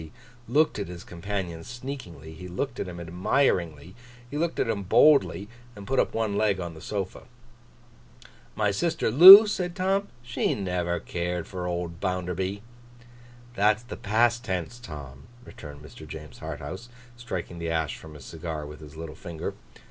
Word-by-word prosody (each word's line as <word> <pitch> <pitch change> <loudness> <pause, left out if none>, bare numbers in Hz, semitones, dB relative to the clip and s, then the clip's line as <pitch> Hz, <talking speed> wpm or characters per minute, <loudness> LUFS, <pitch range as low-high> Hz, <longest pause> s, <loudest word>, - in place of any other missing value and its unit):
He 80 -1 -11 0.4
looked 145 +1 +2
at 100 - -3
his 90 -1 -9
companion 90 -2 -5
sneakingly, 120 - -8
he 90 +3 -9
looked 110 +10 -4
at - - -3
him 90 -1 -7
admiringly, 85 - 0 0.4
he - - -6
looked 165 +2 -1
at - - +1
him 105 -3 -1
boldly, 100 0 +4 0.3
and 100 -1 -10
put 135 +5 0
up - - 0
one 110 -3 0
leg 105 -2 +1
on 85 -2 -5
the 80 - -12
sofa. 100 -3 -5 1.3
'My 105 -1 +1
sister 160 +4 0
Loo?' 190 - +12
said 180 -4 -3
Tom. 195 +1 0 0.2
'She 120 0 -1
never 90 -3 -2
cared 90 0 -3
for 90 -2 -5
old 85 -1 -4
Bounderby.' 95 +1 -2 0.9
'That's 105 +1 +2
the 120 - -8
past 120 +3 +1
tense, 95 +1 -4
Tom,' 70 - -10 0.2
returned 75 -1 -11
Mr. 75 +2 -12
James 75 -3 -10
Harthouse, 95 +12 -7 0.3
striking 90 -7 -6
the 85 0 -3
ash 80 -2 -1
from 80 -1 -12
his 70 -3 -12
cigar 80 -2 -6
with 75 0 -10
his 75 -1 -12
little 80 -1 -7
finger. 80 0 -6
90 Hz, 165 wpm, -26 LUFS, 80-115 Hz, 1.3 s, Loo